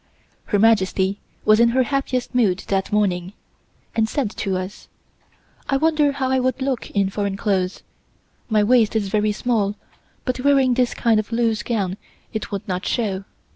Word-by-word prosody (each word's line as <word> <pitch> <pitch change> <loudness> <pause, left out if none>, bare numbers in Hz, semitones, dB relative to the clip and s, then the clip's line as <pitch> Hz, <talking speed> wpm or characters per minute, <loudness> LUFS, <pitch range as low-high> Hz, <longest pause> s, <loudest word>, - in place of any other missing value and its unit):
Her 205 - +1
Majesty 200 -2 +2 0.3
was 215 +1 +5
in 235 0 +5
her 255 +2 +3
happiest 260 -1 -2
mood 210 -7 +2
that 195 -1 0
morning 190 -3 0 0.6
and 220 -1 +2
said 260 -7 -1
to 195 -4 -2
us: 185 +2 -7 0.8
"I 275 - +3
wonder 305 -1 +2
how 265 -2 -1
I 265 - +3
would 255 +1 0
look 260 -2 -2
in 195 -1 0
foreign 200 -1 -2
clothes; 190 -3 -1 0.7
my 215 -2 +3
waist 230 -1 +3
is 205 -3 0
very 210 +1 +1
small, 210 -2 0 0.5
but 255 -1 -2
wearing 270 -1 +4
this 250 0 +1
kind 225 -2 +3
of 215 +2 -4
loose 230 -2 +1
gown 200 -5 -2 0.4
it 220 - -4
would 205 +2 -4
not 185 0 -3
show. 200 -5 -1
220 Hz, 170 wpm, -22 LUFS, 200-250 Hz, 0.8 s, was